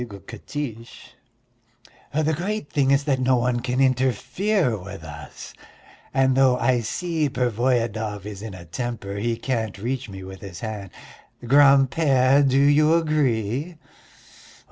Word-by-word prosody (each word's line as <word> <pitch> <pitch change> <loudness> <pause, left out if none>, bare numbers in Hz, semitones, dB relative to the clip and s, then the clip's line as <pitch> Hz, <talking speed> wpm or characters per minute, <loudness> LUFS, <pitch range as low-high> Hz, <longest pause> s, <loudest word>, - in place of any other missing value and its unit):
giggled 100 -5 -9
Katiche. 120 -6 -7 1.0
"The 155 +2 +1
great 185 +1 -3
thing 140 -2 +2
is 140 +1 +3
that 140 -3 0
no 130 0 +3
one 120 0 0
can 125 +1 -2
interfere 130 - +1
with 95 -3 -9
us, 75 -2 -10 0.6
and 130 -1 +2
though 130 -2 +4
I 125 -1 +2
see 160 - -2
Pervoyedov 115 -4 -1
is 105 -2 -7
in 110 -3 -7
a 90 -2 -11
temper, 105 +1 -5
he 115 +2 -1
can't 115 -6 -3
reach 120 +3 -4
me 95 -1 -8
with 95 0 -10
his 95 -4 -9
hand. 105 -4 -5 0.6
Grand 135 0 +5
père, 135 -2 +3
do 130 - +2
you 150 +3 +4
agree?" 150 - 0
125 Hz, 140 wpm, -23 LUFS, 110-140 Hz, 1.0 s, Grand